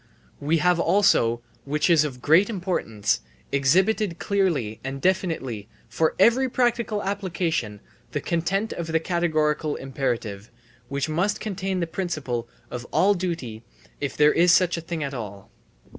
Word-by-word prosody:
We 155 Hz, +4 st, +1 dB
have 180 Hz, +2 st, +3 dB
also, 120 Hz, -, +3 dB, 0.2 s
which 150 Hz, +2 st, 0 dB
is 165 Hz, -4 st, +5 dB
of 125 Hz, -5 st, -5 dB
great 170 Hz, +8 st, +5 dB
importance, 175 Hz, -, -1 dB, 0.3 s
exhibited 180 Hz, +7 st, +2 dB
clearly 170 Hz, -, 0 dB
and 135 Hz, +1 st, -4 dB
definitely 135 Hz, -, -1 dB, 0.2 s
for 145 Hz, +8 st, 0 dB
every 245 Hz, +6 st, +4 dB
practical 235 Hz, -4 st, 0 dB
application 170 Hz, -, -2 dB, 0.3 s
the -, -, -1 dB
content 185 Hz, +6 st, -1 dB
of 170 Hz, -, -5 dB
the 160 Hz, 0 st, +1 dB
categorical 155 Hz, -3 st, 0 dB
imperative, 120 Hz, -6 st, -3 dB, 0.4 s
which 140 Hz, +1 st, -2 dB
must 175 Hz, +7 st, 0 dB
contain 195 Hz, -3 st, -3 dB
the -, -, +1 dB
principle 155 Hz, -10 st, -3 dB, 0.2 s
of 120 Hz, -1 st, -5 dB
all 205 Hz, +2 st, +4 dB
duty 170 Hz, -, -4 dB, 0.4 s
if 140 Hz, -2 st, -4 dB
there 150 Hz, 0 st, +5 dB
is 175 Hz, +1 st, +5 dB
such 175 Hz, 0 st, +4 dB
a 170 Hz, -, -4 dB
thing 165 Hz, -1 st, -4 dB
at 140 Hz, -1 st, -4 dB
all. 100 Hz, -5 st, -7 dB
165 Hz, 145 wpm, -24 LUFS, 135-190 Hz, 0.4 s, is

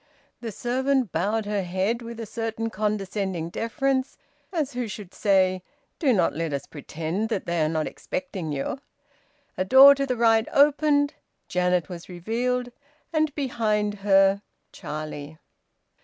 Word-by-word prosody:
The 230 Hz, -2 st, -5 dB
servant 255 Hz, -, 0 dB
bowed 210 Hz, +4 st, 0 dB
her 205 Hz, -1 st, -1 dB
head 190 Hz, +6 st, -1 dB
with 235 Hz, 0 st, -8 dB
a 225 Hz, -, -4 dB
certain 225 Hz, 0 st, -3 dB
condescending 195 Hz, -5 st, -2 dB
deference, 260 Hz, -, -1 dB, 0.3 s
as 305 Hz, -6 st, -2 dB
who 245 Hz, -1 st, -2 dB
should 205 Hz, -3 st, -8 dB
say: 185 Hz, -2 st, +2 dB, 0.4 s
"Do 280 Hz, -5 st, +3 dB
not 185 Hz, -7 st, +2 dB
let 160 Hz, 0 st, -3 dB
us 140 Hz, -, -3 dB
pretend 165 Hz, +7 st, -4 dB
that 220 Hz, -, -2 dB
they 170 Hz, -1 st, 0 dB
are 155 Hz, -, +1 dB
not 155 Hz, -1 st, -1 dB
expecting 200 Hz, -, -5 dB
you." 145 Hz, -, -3 dB, 0.8 s
A -, -, +3 dB
door 265 Hz, +8 st, +9 dB
to 275 Hz, 0 st, -2 dB
the 250 Hz, -2 st, -1 dB
right 225 Hz, -1 st, +4 dB
opened. 290 Hz, 0 st, +4 dB, 0.3 s
Janet 180 Hz, -1 st, +1 dB
was 175 Hz, -1 st, -9 dB
revealed, 245 Hz, +7 st, -2 dB, 0.4 s
and, 310 Hz, -1 st, +2 dB
behind 215 Hz, -6 st, 0 dB
her, 195 Hz, 0 st, +4 dB, 0.3 s
Charlie. 155 Hz, 0 st, -7 dB
215 Hz, 140 wpm, -25 LUFS, 180-250 Hz, 0.8 s, door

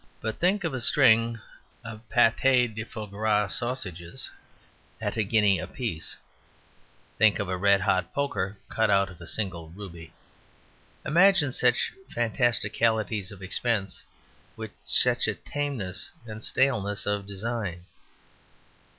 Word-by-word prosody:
But 110 Hz, -1 st, -4 dB
think 190 Hz, +3 st, +2 dB
of 165 Hz, -, -1 dB
a 130 Hz, -, -3 dB
string 115 Hz, -3 st, +4 dB, 0.5 s
of 110 Hz, -1 st, -8 dB
pate 125 Hz, -1 st, +3 dB
de 110 Hz, +1 st, -4 dB
foie 110 Hz, -1 st, -7 dB
gras 105 Hz, 0 st, 0 dB
sausages 95 Hz, -9 st, -3 dB, 0.7 s
at -, -, -3 dB
a -, -, +1 dB
guinea 105 Hz, -2 st, +3 dB
a -, -, -5 dB
piece! 115 Hz, -, -4 dB, 1.0 s
Think 110 Hz, 0 st, +5 dB
of 100 Hz, -, -3 dB
a 95 Hz, -, -1 dB
red 100 Hz, +1 st, +3 dB
hot 95 Hz, 0 st, +1 dB
poker 110 Hz, -9 st, -2 dB
cut 110 Hz, -1 st, +1 dB
out 100 Hz, -1 st, +3 dB
of 90 Hz, 0 st, -15 dB
a 85 Hz, -, -9 dB
single 85 Hz, -6 st, -4 dB
ruby! 85 Hz, -3 st, -10 dB, 0.9 s
Imagine 175 Hz, -3 st, +4 dB
such 125 Hz, -1 st, +2 dB, 0.2 s
fantasticalities 110 Hz, -3 st, 0 dB
of 100 Hz, -2 st, -11 dB
expense 100 Hz, 0 st, -2 dB, 0.5 s
with -, -, -7 dB, 0.2 s
such -, -, +5 dB
a -, -, 0 dB
tameness 145 Hz, -, -4 dB, 0.2 s
and 110 Hz, -1 st, -8 dB
staleness 110 Hz, -5 st, +1 dB
of 105 Hz, -1 st, -2 dB
design. 100 Hz, -3 st, -4 dB
110 Hz, 130 wpm, -27 LUFS, 100-120 Hz, 1.0 s, Think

